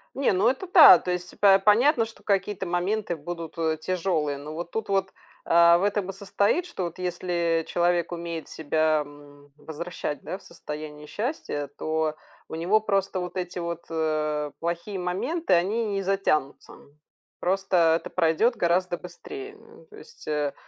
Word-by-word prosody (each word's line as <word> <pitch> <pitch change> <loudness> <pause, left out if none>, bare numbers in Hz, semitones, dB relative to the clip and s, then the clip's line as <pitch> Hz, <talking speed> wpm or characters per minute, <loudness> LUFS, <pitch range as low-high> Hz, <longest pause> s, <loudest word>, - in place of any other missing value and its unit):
Не, 275 -6 +2
ну 195 +5 +3
это 270 +8 -2
та, 325 - +9
то 180 - -4
есть 180 0 -4
по 195 -1 +7
понятно, 225 +5 +4
что 225 - -13
какие-то 195 -1 -1
моменты 175 +1 -1
будут, 165 +2 -7
э, 160 -1 +1
тяжелые, 165 -6 -1
ну 150 +2 -8
вот 170 +2 -6
тут, 220 -2 -4 0.6
а, 170 0 +6
в - - -2
этом 200 -1 0
и - - -5
состоит, 200 - 0
что 190 - -4
вот 170 +2 -6
если 170 -2 -1
человек 175 0 +1
умеет 170 -1 -5
себя, 155 0 +1
м, 145 0 -16
возвращать, 160 -2 -6
да, 185 - -5
в - - -21
состояние 150 -2 -8
счастья, 205 - -3
то 155 -1 -1 0.3
у - - -7
него 175 +7 +2
просто 195 -3 0
вот 180 0 -5
эти 180 0 -4
вот, 170 -1 -5
э, 155 -2 -1
плохие 170 +4 -3
моменты, 195 - -2
они 205 +7 +1
не 200 -1 -2
затянутся. 180 -8 -1 0.7
Просто 180 -3 +2
это - - -9
пройдет 175 +8 +2
гораздо 175 +1 +1
быстрее. 400 - -9
М, 440 - -18
то 430 -2 -16
есть, 460 +2 -14
э, 150 -2 -1
175 Hz, 165 wpm, -26 LUFS, 160-200 Hz, 0.7 s, та